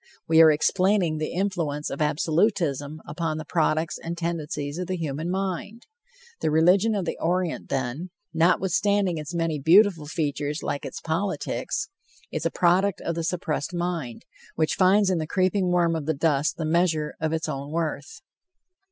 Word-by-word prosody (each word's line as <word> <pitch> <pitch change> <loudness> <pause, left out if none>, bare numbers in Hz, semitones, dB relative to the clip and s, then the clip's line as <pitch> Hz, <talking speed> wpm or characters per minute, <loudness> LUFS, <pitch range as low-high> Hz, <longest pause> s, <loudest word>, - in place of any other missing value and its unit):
We 160 0 +6
are 160 - +9
explaining 180 +1 +2
the 155 - -2
influence 170 -6 -2
of 140 - -4
absolutism 155 - 0
upon 155 0 -3
the 155 - -6
products 155 0 0
and 170 +1 -5
tendencies 155 -3 -3
of 180 - -3
the 185 - -2
human 155 0 -3
mind. 195 +4 -3 0.5
The - - 0
religion 180 +8 +4
of 195 -3 -1
the - - -4
Orient, 175 0 -1
then, 135 +7 -3 0.2
notwithstanding 185 +2 +2
its 155 +3 -6
many 165 -3 -1
beautiful 170 0 +4
features 150 -1 -2
like 140 - -3
its - - -8
politics, 180 +5 -2 0.4
is - - -1
a - - -1
product 185 +2 +2
of 170 - -2
the 165 0 -3
suppressed 170 -1 -2
mind, 170 -9 -3 0.3
which 155 -1 +1
finds 190 +1 +4
in 180 - +1
the 155 - -3
creeping 185 +2 +1
worm 175 -2 +2
of 155 -2 -4
the 160 - +1
dust 150 0 +1
the 160 - -2
measure 160 -2 +1
of 160 0 -1
its 160 0 -2
own 140 -2 -4
worth. 170 - -3
165 Hz, 165 wpm, -25 LUFS, 155-185 Hz, 0.5 s, are